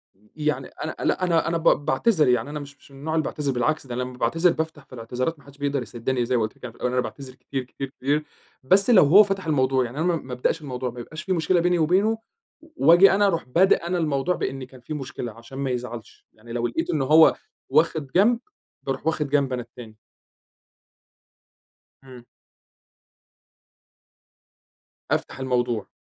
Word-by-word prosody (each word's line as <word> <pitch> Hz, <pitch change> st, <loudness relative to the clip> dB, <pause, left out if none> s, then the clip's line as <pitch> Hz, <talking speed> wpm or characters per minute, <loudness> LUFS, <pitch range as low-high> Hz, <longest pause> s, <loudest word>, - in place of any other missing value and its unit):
أ -, -, -34 dB, 0.2 s
يعني 150 Hz, -1 st, -1 dB
أنا 155 Hz, -, -6 dB
لا، -, -, 0 dB
أنا 165 Hz, -3 st, +2 dB
أنا 170 Hz, +1 st, 0 dB
ب 165 Hz, -, -7 dB, 0.2 s
باعتذر، 155 Hz, -, +2 dB
يعني 125 Hz, +1 st, +1 dB
أنا 150 Hz, 0 st, -5 dB
مش 140 Hz, -1 st, -11 dB
مش -, -, -21 dB
النوع 140 Hz, +4 st, -5 dB
اللي 160 Hz, -, +2 dB
باعتذر، 145 Hz, -2 st, -2 dB
بالعكس 135 Hz, +4 st, -1 dB
ده 120 Hz, -, -5 dB
أنا 125 Hz, -, -2 dB
لمّا 125 Hz, 0 st, -8 dB
باعتذر 165 Hz, +6 st, +2 dB
بافتَح 160 Hz, -3 st, -4 dB
في -, -, -18 dB
الإعتذارات 125 Hz, +6 st, -3 dB
ما -, -, -21 dB
حدش 140 Hz, 0 st, -16 dB
بيقدَر 140 Hz, -1 st, -1 dB
يسِدّني، 120 Hz, +2 st, -2 dB
زي 125 Hz, -, 0 dB
ما -, -, +1 dB
قلت 110 Hz, -, -4 dB
لِك -, -, -29 dB
أنا 125 Hz, -, -6 dB
في -, -, -22 dB
الأول، 125 Hz, -, -1 dB
أنا 125 Hz, -, +2 dB
باعتذر 130 Hz, +1 st, -8 dB
كتير، 135 Hz, 0 st, -5 dB
كتير، 135 Hz, +2 st, -7 dB
كتير، 145 Hz, +3 st, -1 dB, 0.4 s
بس 195 Hz, -, +3 dB
لو 230 Hz, -6 st, +7 dB
هو 180 Hz, +9 st, +8 dB
فتَح 195 Hz, -2 st, -3 dB
الموضوع، 130 Hz, -4 st, +2 dB
يعني 120 Hz, +4 st, -8 dB
أنا 160 Hz, -, 0 dB
ما 175 Hz, -1 st, +2 dB
ما 130 Hz, -5 st, -6 dB
ابدأش 125 Hz, +6 st, -1 dB
الموضوع، 130 Hz, -3 st, -4 dB
ما 120 Hz, -, -10 dB
يبقاش 155 Hz, +6 st, -8 dB
في 190 Hz, -, -1 dB
مشكلة 175 Hz, +1 st, +2 dB
بيني 175 Hz, 0 st, +2 dB
وبينه 190 Hz, +8 st, +2 dB, 0.4 s
و 320 Hz, -, -18 dB
وآجي 175 Hz, -, +7 dB
أنا 200 Hz, +1 st, +3 dB
أرُوح 165 Hz, -4 st, 0 dB
بادئ 170 Hz, +5 st, +3 dB
أنا 180 Hz, +1 st, 0 dB
الموضوع 155 Hz, +1 st, 0 dB
بإن 135 Hz, -1 st, -4 dB
كان 130 Hz, 0 st, -13 dB
في 155 Hz, -, -7 dB
مشكلة، 130 Hz, -4 st, -5 dB
عشان 115 Hz, +4 st, -12 dB
ما 135 Hz, -1 st, -2 dB
يزعَلش، 120 Hz, -3 st, -7 dB
يعني 115 Hz, +2 st, -14 dB
لو 120 Hz, 0 st, 0 dB
لقيت 120 Hz, +8 st, -3 dB
إنه 150 Hz, -4 st, 0 dB
هو 155 Hz, +3 st, +6 dB, 0.3 s
واخِد 155 Hz, +1 st, +2 dB
جنب، 225 Hz, +6 st, +4 dB, 0.4 s
بارُوح 135 Hz, -1 st, -4 dB
واخِد 155 Hz, -3 st, 0 dB
جنب 140 Hz, -2 st, +1 dB
أنا 125 Hz, -, -2 dB
التاني. 115 Hz, -2 st, -13 dB, 2.1 s
امم. 125 Hz, -2 st, -13 dB, 2.9 s
أفتَح -, -, -2 dB
الموضوع. 120 Hz, -4 st, -1 dB
140 Hz, 195 wpm, -24 LUFS, 125-165 Hz, 2.9 s, هو